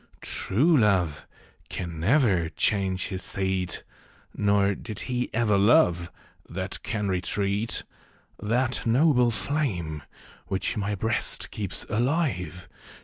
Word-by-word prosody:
True 150 - +2
love 95 - +2 0.4
can 85 -3 -5
never 95 - +3
change 95 -2 0
his 95 0 -4
seat; 95 -2 -2 0.5
Nor 100 -1 +3
did 105 +1 -5
he 125 -1 -2
ever 110 -3 +2
love 100 - +4 0.4
that 95 +2 -4
can 105 -4 -2
retreat. 100 +4 -1 0.6
That 120 +4 0
noble 125 0 +4
flame, 105 - -2 0.5
which 95 0 -1
my 105 0 -1
Ijreast 110 +4 -1
keeps 100 -3 -3
alive. 110 - -1
100 Hz, 105 wpm, -26 LUFS, 95-120 Hz, 0.6 s, love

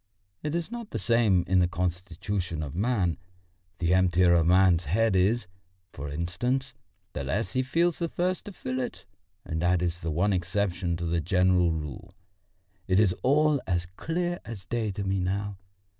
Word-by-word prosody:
It 150 +1 -2
is 170 +5 -3
not 235 -2 -6
the - - -3
same 105 -3 +3
in 95 +1 +3
the 90 - +4
constitution 90 -1 -3
of 70 -2 -6
man: 95 - 0 0.6
the 85 0 +1
emptier 90 -1 +4
a 85 -1 +4
man's 90 0 +4
head 105 +6 +2
is, 100 +6 +2 0.5
for 70 +1 -6
instance, 120 - -2 0.4
the - - -3
less 95 - -2
he 130 - +2
feels 165 +6 +1
the 170 - 0
thirst 180 +2 -1
to 205 - -7
fill 130 -8 -4
it, 125 - -5 0.4
and 80 0 -3
that 90 0 +2
is 85 0 -2
the 80 - -3
one 95 +6 +1
exception 90 -1 -1
to 85 - -4
the 85 0 0
general 90 -1 +3
rule. 75 -4 -6 0.7
It 95 +1 +3
is 100 -4 +4
all 150 +1 +3
as 90 -2 0
clear 175 - -2
as 105 -5 -8
day 115 +2 -1
to 100 - -4
me 95 0 0
now. 100 +2 -2
95 Hz, 175 wpm, -27 LUFS, 85-120 Hz, 0.7 s, the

